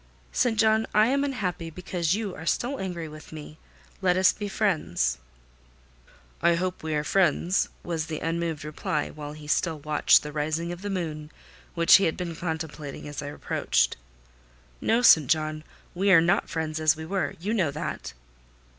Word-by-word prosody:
"St. 230 -3 +1
John, 220 0 +3
I 215 +2 +5
am 275 +1 +2
unhappy 185 - -3
because 175 0 -1
you 210 -3 -3
are 160 0 -9
still 265 +8 0
angry 175 -4 -4
with 155 0 -12
me. 155 0 -10 0.4
Let 180 -1 +3
us 185 0 +5
be 205 - -5
friends." 155 - 0 1.2
"I 170 - +4
hope 185 +1 -2
we 155 -1 -2
are 150 - 0
friends," 180 +2 +2
was 165 -2 -3
the 155 - -4
unmoved 165 -1 -2
reply; 150 0 -2
while 150 -1 -8
he 150 0 -11
still 160 +2 0
watched 150 0 +4
the 150 - -6
rising 155 +3 -2
of 175 +1 -7
the 205 - -4
moon, 155 -5 -4 0.5
which 170 +3 +7
he 195 - +1
had 160 - 0
been 175 -2 -4
contemplating 160 -4 -5
as 145 - -5
I 140 - -6
approached. 65 - 0 0.9
"No, 230 +2 +2
St. 155 - +7
John, 155 -1 0 0.3
we 195 +2 +2
are 175 - +8
not 170 +2 +2
friends 160 -2 -3
as 155 -1 +4
we 160 0 -7
were. 190 +2 -2
You 205 +6 -2
know 185 -10 +2
that." 150 - -5
165 Hz, 175 wpm, -26 LUFS, 155-185 Hz, 1.2 s, are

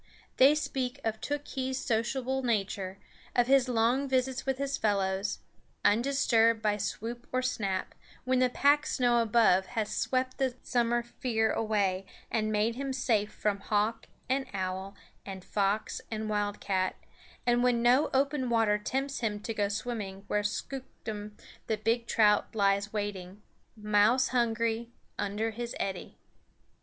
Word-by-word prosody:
They 275 +3 +7
speak 270 -3 -2
of 220 -1 -2
Tookhees' 275 -2 -3
sociable 255 +3 -1
nature, 200 -5 -1 0.4
of 245 - +4
his 265 0 +4
long 245 +4 +2
visits 260 0 0
with 265 -1 +1
his 275 0 -1
fellows, 195 -3 0 0.4
undisturbed 230 0 +3
by 210 -1 +1
swoop 230 +4 -4
or 255 0 0
snap, 200 -7 -2 0.3
when 255 0 +2
the 255 0 +4
packed 285 +4 +3
snow 240 -2 +2
above 215 -5 +4
has 215 -1 0
swept 255 0 -1
the 260 -2 0
summer 240 -1 +1
fear 235 -2 0
away 195 -4 0 0.2
and 215 -1 0
made 215 +2 +1
him 270 +2 -3
safe 220 -5 +1
from 205 -1 -1
hawk 210 +2 0 0.2
and 265 +1 0
owl 190 +1 -3 0.3
and 190 -2 -8
fox 205 +1 -1
and 220 -1 -3
wildcat, 205 -2 -1 0.5
and 240 0 +3
when 245 -1 +2
no 250 +5 +4
open 270 -1 +1
water 225 -3 +3
tempts 270 +6 -2
him 210 -3 -1
to 225 - -4
go 205 -2 +1
swimming 205 -3 -4
where 210 +1 0
Skooktum 210 -2 -5 0.3
the 220 - 0
big 230 +2 0
trout 210 0 +3
lies 200 0 +2
waiting, 205 -2 -5 0.3
mouse 210 +5 +3
hungry, 230 -1 0 0.3
under 210 +3 -1
his 235 +2 -5
eddy. 190 -2 -4
225 Hz, 140 wpm, -30 LUFS, 205-255 Hz, 0.5 s, They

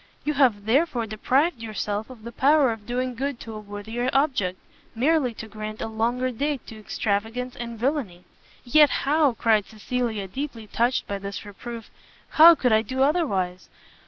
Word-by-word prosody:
You 300 - 0
have 245 -8 +2
therefore 250 0 +2
deprived 255 +7 0
yourself 215 0 -3
of 245 -4 -12
the 235 - -7
power 280 0 +4
of 220 -2 -8
doing 250 +1 -2
good 270 +1 -3
to 225 - -8
a 215 - -6
worthier 215 +4 -4
object, 255 -11 +1 0.4
merely 275 +1 +2
to 220 - -8
grant 215 0 -7
a - - -3
longer 235 +3 -1
date 280 +2 -2
to 220 - -10
extravagance 225 +4 -2
and 235 -1 -6
villainy." 230 - -2 0.4
"Yet 295 +4 +5 0.2
how," 290 -2 +3
cried 220 -3 +2
Cecilia, 220 -2 -3
deeply 240 +1 -6
touched 240 +4 0
by 200 -1 -4
this 200 +1 -6
reproof, 230 +3 -9 0.4
"how 330 +2 +8
could 250 -5 +1
I 220 - +5
do 260 +4 -1
otherwise! 195 - 0
235 Hz, 165 wpm, -25 LUFS, 215-265 Hz, 0.4 s, how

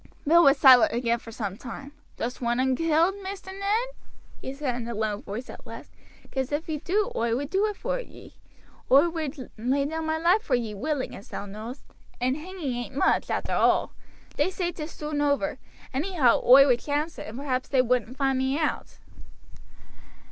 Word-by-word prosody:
Bill 340 +3 +6
was 275 0 +6
silent 260 -5 +7
again 235 0 0
for 230 - -11
some 200 -3 -4
time. 270 +4 -8 0.3
"Dost 245 +2 -4
want 240 0 0
un 260 0 +2
killed, 330 +4 +2
Maister 380 0 -7
Ned?" 410 +5 -1 0.5
he - - -5
said 275 -2 -3
in 240 -1 -5
a 235 - -4
low 215 -1 -1
voice 220 +6 -6
at - - -11
last; - - -10 0.4
"'cause 265 0 -2
if 295 +2 -2
ye 310 -2 -3
do 400 +6 0
oi 230 0 +1
would 285 +4 -4
do 395 +3 +2
it 420 - -4
for - - -2
ye. - - -12 0.6
Oi 280 +6 +7
would 310 -5 -5
lay 265 +5 +1
down 320 +2 -3
my 315 0 0
life 350 +6 +3
for 265 - +1
ye 230 -3 -2
willing, 280 +6 -3
as 200 - -12
thou - - -5
knowst; 215 +6 -8 0.4
and 255 +2 +1
hanging 320 -3 -5
ain't 245 +2 -5
much, 280 - +2
arter - - -2
all. - - +2 0.4
They - - +2
say 360 -2 -2
'tis 310 -2 -6
soon 300 -1 -3
over. 290 -1 0 0.3
Anyhow 285 -3 +2
oi 270 +3 +8
would 250 -3 +3
chance 300 +4 -2
it, - - -7
and 220 +3 -8
perhaps 260 -2 -2
they 260 -2 +3
wouldn't 250 0 0
find 270 -2 +1
me 265 +2 0
out." 310 -2 -2
275 Hz, 195 wpm, -26 LUFS, 245-320 Hz, 0.6 s, oi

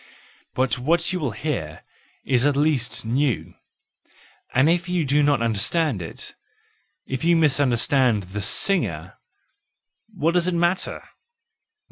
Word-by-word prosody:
But 130 0 0
what 170 +7 +1
you 180 - -1
will 145 -5 -1
hear 100 - -4 0.4
is 125 -2 +2
at 145 - +1
least 145 -7 0
new; 130 +1 -1 1.0
and 130 +4 +3
if 175 +2 +1
you 175 -3 0
do 145 +2 +2
not 145 -5 +2
understand 115 - 0
it, 80 - -7 0.7
if 130 +1 -4
you 170 +1 +4
misunderstand 130 -6 +2
the 95 +3 -6
singer, 185 - 0 0.9
what 170 -5 0
does 175 0 +1
it 180 - 0
matter! 175 +2 0
145 Hz, 125 wpm, -23 LUFS, 120-170 Hz, 1.0 s, you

